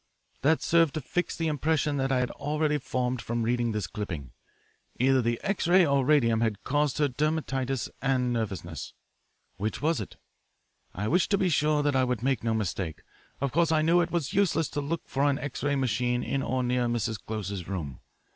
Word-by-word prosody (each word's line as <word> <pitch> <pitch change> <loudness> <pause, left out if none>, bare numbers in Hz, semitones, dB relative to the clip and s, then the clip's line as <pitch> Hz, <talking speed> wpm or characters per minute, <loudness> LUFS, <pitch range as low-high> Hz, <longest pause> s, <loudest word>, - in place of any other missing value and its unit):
That 155 +4 +3
served 165 -4 +3
to 155 - -2
fix 175 +7 -2
the 165 - -1
impression 150 -1 +1
that 135 0 0
I 130 -1 +2
had 125 - -1
already 150 +1 0
formed 125 -1 -2
from 120 0 -2
reading 120 0 +1
this 105 -3 -2
clipping. 90 - -5 0.7
Either 130 +1 +4
the 115 0 0
X 195 -3 -1
ray 180 +1 +6
or 140 -2 +2
radium 120 -6 +3
had 110 -3 -1
caused 145 -1 +1
her 150 - +3
dermatitis 135 -2 -1
and 125 -2 +1
nervousness. 95 - -4 0.6
Which 105 +2 -2
was 160 -4 +1
it? 100 - -8 0.8
I 100 +3 -2
wished 175 +9 +2
to 200 - +3
be 190 -2 +2
sure 150 -1 +2
that 145 -1 +1
I 130 - +4
would 125 -3 -1
make 135 -4 +1
no 115 -1 +1
mistake. 90 -6 -3 0.4
Of 140 -1 -1
course 165 +1 +2
I 155 -1 +3
knew 170 +2 +4
it 170 - -1
was 170 -2 -2
useless 170 -6 +2
to 145 - -3
look 160 +3 -3
for 135 - -2
an 140 - +1
X 145 0 -5
ray 145 +1 +1
machine 125 -1 0
in 135 - -1
or 130 -1 -1
near 125 0 +1
Mrs. 115 -2 -2
Close's 100 -4 -4
room. 75 -10 -5
130 Hz, 200 wpm, -28 LUFS, 115-150 Hz, 0.8 s, ray